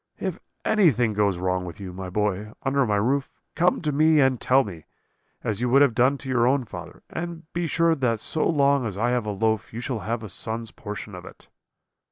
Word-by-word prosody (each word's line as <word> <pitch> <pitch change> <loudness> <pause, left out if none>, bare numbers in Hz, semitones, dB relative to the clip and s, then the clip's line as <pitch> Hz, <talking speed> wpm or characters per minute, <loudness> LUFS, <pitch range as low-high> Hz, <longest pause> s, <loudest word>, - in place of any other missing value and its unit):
If - - -3 0.3
anything 145 - +3
goes 100 -3 +1
wrong 90 0 -1
with 90 0 -8
you, 95 -3 -7
my 95 0 -6
boy, 105 +2 -1
under 135 -1 +2
my 105 - +1
roof, 135 +7 0 0.2
come 175 0 +2
to 150 - +1
me 155 +2 +4
and 130 -3 +3
tell 135 +2 +4
me, 85 -8 -9 0.6
as 110 0 -2
you 125 - +1
would 135 +3 +6
have 135 -5 +3
done 130 +5 +3
to 135 - -10
your 125 -2 +2
own 135 +1 +2
father, 90 -4 -10
and 170 -1 -5
be 170 0 -1
sure 165 +1 +3
that 125 -7 0
so 155 +8 -1
long 140 -5 +3
as 100 -3 -6
I 120 +3 +1
have 120 -3 0
a - - 0
loaf 110 +2 0
you 115 - -6
shall 125 -1 -3
have 115 +4 -3
a 110 - -7
son's 115 +3 -3
portion 105 0 -7
of 90 -1 -8
it.' - - -13
120 Hz, 225 wpm, -25 LUFS, 105-140 Hz, 0.6 s, would